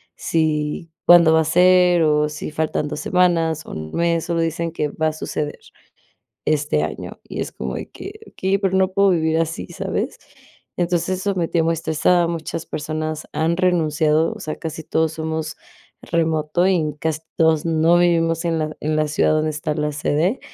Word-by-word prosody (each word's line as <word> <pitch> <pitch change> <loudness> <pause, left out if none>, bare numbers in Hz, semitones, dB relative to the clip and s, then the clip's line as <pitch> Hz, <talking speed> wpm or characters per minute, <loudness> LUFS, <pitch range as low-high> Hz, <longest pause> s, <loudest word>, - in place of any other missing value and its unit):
si 155 0 -1
cuándo 170 -2 +7
va 160 - +5
a 160 - -1
ser, 180 0 +5
o 150 0 +2
si 150 0 -6
faltan 155 -1 -1
2 150 - -4
semanas, 165 -3 +1
o - - -10
1 80 0 -6
mes, 170 -1 +1
solo 170 -1 0
dicen 165 0 -2
que 150 -2 -2
va 160 +2 -1
a - - -6
suceder 150 -1 -4 0.9
este 145 - +1
año, 80 - -6
y - - -6
es - - -4
como 65 0 -5
de - - -7
que: - - -10
"Okey, 190 +1 0
pero 190 -1 0
no 190 0 +3
puedo 200 0 +4
vivir 160 -2 +1
así", 165 0 -2
¿sabes?, - - -3 0.6
entonces, 175 +1 0
eso 200 0 -1
me 170 -3 -1
tiene 165 -2 +1
muy 165 - +2
estresada, 165 +2 +2
muchas 165 -1 -4
personas 155 0 -4
han 165 +2 0
renunciado, 160 -3 +2
o - - -11
sea, 155 - -4
casi 160 0 -6
todos 160 0 0
somos 160 0 -4 0.5
remoto, 160 +1 0
y 155 -6 +1
casi 160 -1 -1 0.2
todos 160 -1 +3
no 165 +1 +3
vivimos 165 -1 +2
en 165 -1 0
la 155 0 -3
en 155 +1 -1
la 155 0 +2
ciudad 150 - +2
donde 155 0 +1
está 150 0 -3
la 150 -1 -1
sede, 155 - 0
160 Hz, 185 wpm, -21 LUFS, 155-170 Hz, 0.9 s, cuándo